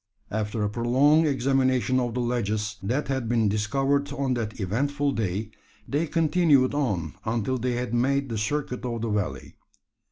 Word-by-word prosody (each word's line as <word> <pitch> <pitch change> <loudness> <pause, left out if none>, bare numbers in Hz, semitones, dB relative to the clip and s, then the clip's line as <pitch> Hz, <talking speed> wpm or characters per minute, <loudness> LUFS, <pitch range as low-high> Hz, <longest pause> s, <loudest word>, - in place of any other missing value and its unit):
After 105 0 -2
a 105 - +1
prolonged 135 +8 +3
examination 130 -1 +2
of 120 -2 -2
the 125 - 0
ledges, 110 -3 -1
that 125 +10 -1
had 130 -4 -2
been 115 -3 +2
discovered 135 +8 0
on 135 -2 -1
that 115 -2 -4
eventful 140 +9 0
day, 110 -2 -2 0.4
they 150 +4 0
continued 155 -4 +3
on 100 - -1
until 115 +3 -1
they 125 +1 -1
had 120 -1 -3
made 135 +3 +1
the 115 - -3
circuit 125 +3 -2
of 120 -2 -3
the 115 - -1
valley. 90 -11 -3
125 Hz, 160 wpm, -26 LUFS, 110-140 Hz, 0.4 s, prolonged